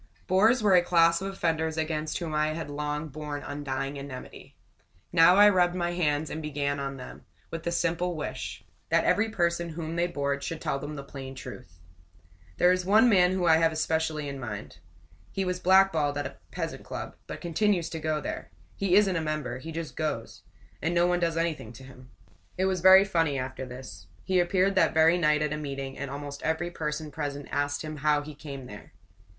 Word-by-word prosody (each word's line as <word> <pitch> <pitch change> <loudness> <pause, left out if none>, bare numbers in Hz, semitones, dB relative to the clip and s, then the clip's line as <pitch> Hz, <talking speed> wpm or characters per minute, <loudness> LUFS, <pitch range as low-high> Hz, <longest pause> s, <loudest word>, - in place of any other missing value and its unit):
Bores 215 +6 +4
were 205 -2 +5
a 180 - +7
class 170 -1 +4
of 195 0 -3
offenders 160 -4 -1
against 155 -1 -2
whom 165 -3 -4
I 155 0 +1
had 160 -2 -5
long 150 +1 -3
borne 150 0 -6
undying 140 -1 -4
enmity. 140 -2 -9 0.6
Now 175 +1 +7
I 205 +1 +8
rubbed 180 -3 +3
my 175 -1 -1
hands 155 -3 0
and 160 - -4
began 140 -2 -2
on 140 0 -4
them, 125 - -10 0.3
with 165 - -4
this 170 +1 -1
simple 175 +1 0
wish: 155 - -5 0.3
That - - +3
every 220 +2 +2
person 170 -4 0
whom 160 0 -5
they 175 +1 +2
bored 140 -4 -2
should 165 +2 -4
tell 140 - -2
them 150 +2 -6
the 140 - -6
plain 135 -1 -8
truth. 85 -9 -10 0.8
There 180 - +5
is 185 0 +1
one 215 +6 +5
man 180 -4 +5
whom 185 -1 0
I 160 -1 +6
have 165 -1 +2
specially 155 -1 -1
in 140 -1 -5
mind. 105 -5 -7 0.5
He 195 - -2
was 180 0 -2
blackballed 180 -6 +4
at 145 - -2
a - - -7
pleasant - - -4
club, - - -6
but - - -6
continues 175 0 +1
to 160 - -4
go 155 0 -1
there. 85 - -5 0.3
He 195 -2 +1
isn't 200 -2 +4
a 165 - 0
member 150 -5 -3
he 160 +5 -7
just 165 -1 -5
goes; 150 -8 -3 0.4
and 165 +3 0
no 170 0 +4
one 175 0 +2
does 165 -1 0
anything 165 -9 -2
to 130 - -12
him. 130 -1 -14 0.5
It 190 - +1
was 190 -2 0
very 190 +1 +8
funny 165 -7 +1
after 130 0 -5
this. 125 -9 -10 0.2
He 185 -1 +2
appeared 185 +2 +2
that 190 - +3
very 165 +2 +5
night 150 -2 +3
at 150 0 -1
a - - -3
meeting, 135 -2 -5
and 140 0 -5
almost 140 0 -6
every 160 +2 -1
person 150 -2 -4
present 145 -2 -4
asked 145 +1 -1
him 155 -1 -6
how 150 0 +2
he 150 +1 -8
came 140 -3 -8
there. 105 -4 -11
160 Hz, 205 wpm, -28 LUFS, 145-175 Hz, 0.8 s, I